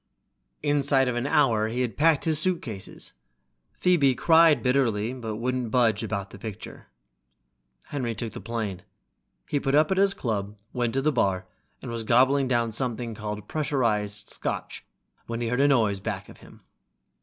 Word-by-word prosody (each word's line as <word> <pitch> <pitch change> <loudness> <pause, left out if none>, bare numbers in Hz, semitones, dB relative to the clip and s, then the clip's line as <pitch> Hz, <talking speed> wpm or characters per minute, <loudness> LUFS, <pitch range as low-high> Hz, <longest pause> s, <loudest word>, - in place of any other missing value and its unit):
Inside 140 -2 +2
of 125 - -1
an 120 +3 -1
hour 115 -8 +3
he 120 +3 -2
had 125 -3 -2
packed 155 -1 +3
his 160 -2 +2
suitcases. 155 - -3 0.6
Phoebe 150 -8 +3
cried 165 +2 +5
bitterly, 125 -4 +1
but 115 -4 -5
wouldn't 125 +1 -2
budge 115 -4 +2
about 100 -2 -4
the 100 - -11
picture. 110 0 -8 1.0
Henry 125 -5 -3
took 115 0 -5
the - - -7
plane. 110 -5 -4 0.7
He 145 - 0
put 135 0 0
up 155 +4 +4
at 190 - +1
his 195 0 +4
club, 105 -4 -3 0.2
went 120 -1 -1
to 135 - +1
the 155 - +3
bar, 95 -8 0 0.4
and - - -5
was 115 -1 -3
gobbling 130 +4 +4
down 120 -2 +1
something 120 0 -3
called 105 -1 -6
pressurized 105 -9 -1
scotch, - - -4 0.4
when 115 0 -3
he 120 -1 -1
heard 125 +3 +1
a 140 - +5
noise 110 -8 +2
back 95 - -5
of - - -13
him. - - -16
120 Hz, 165 wpm, -26 LUFS, 110-140 Hz, 1.0 s, cried